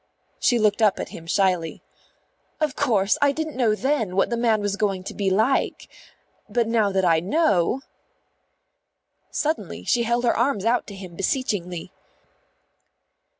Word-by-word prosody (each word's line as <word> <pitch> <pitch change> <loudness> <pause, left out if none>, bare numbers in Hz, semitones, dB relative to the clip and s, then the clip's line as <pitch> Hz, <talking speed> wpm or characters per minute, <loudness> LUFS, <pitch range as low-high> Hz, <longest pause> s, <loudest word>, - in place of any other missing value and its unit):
She 245 - +3
looked 215 0 +2
up 210 -3 +3
at - - -4
him 165 - -10
shyly. 180 -3 0 0.8
"Of 305 -2 0
course 215 -8 +1
I 285 -1 +5
didn't 315 +1 -4
know 235 -4 +2
then 225 -6 -1
what 195 - +2
the - - +1
man 230 -2 +2
was 205 -1 -1
going 200 -3 -1
to - - -7
be 200 -2 0
like. 220 +8 +1 0.6
But 230 +1 +1
now 220 -3 +2
that 190 -1 +1
I 165 -2 +4
know 205 - +1 0.8
" - - -51
Suddenly 310 +2 -3
she 240 - +2
held 235 +1 0
her 240 - +2
arms 235 -4 0
out 240 +2 +1
to 200 - -8
him 185 -3 -10
beseechingly. 185 -5 -2
215 Hz, 155 wpm, -23 LUFS, 190-245 Hz, 0.8 s, I